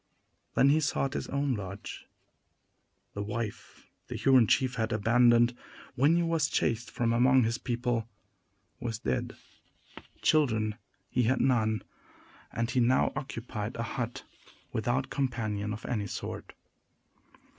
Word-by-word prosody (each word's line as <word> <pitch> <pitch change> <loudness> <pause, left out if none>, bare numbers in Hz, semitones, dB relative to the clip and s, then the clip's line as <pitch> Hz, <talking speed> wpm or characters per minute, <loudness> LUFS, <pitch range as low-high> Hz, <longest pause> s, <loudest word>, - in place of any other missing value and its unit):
Then 135 - +5
he 150 +2 +4
sought 140 -2 0
his - - -3
own 140 -1 0
lodge. 100 -2 -7 1.1
The 100 - -4
wife 105 +1 -5 0.2
the - - -5
Huron 130 -4 +5
chief 130 +2 +2
had 110 -2 -1
abandoned, 120 +2 +4 0.4
when 140 +6 +4
he 170 - +2
was 165 -3 +1
chased 115 0 0
from 115 -1 0
among 125 +2 +5
his 115 +1 0
people, 120 -2 -1 0.7
was 115 -3 -3
dead. 65 - -2 0.9
Children 110 -9 +3 0.4
he 125 - +2
had 130 - +2
none; 110 -4 +2 0.7
and 115 +2 -2
he 130 - +1
now 125 +2 +3
occupied 115 -4 -5
a 115 - -2
hut, 120 +1 -4 0.5
without 120 +4 -1
companion 110 -6 -2
of 105 +2 -6
any 105 -4 -2
sort. - - -6
120 Hz, 130 wpm, -30 LUFS, 110-130 Hz, 1.1 s, Then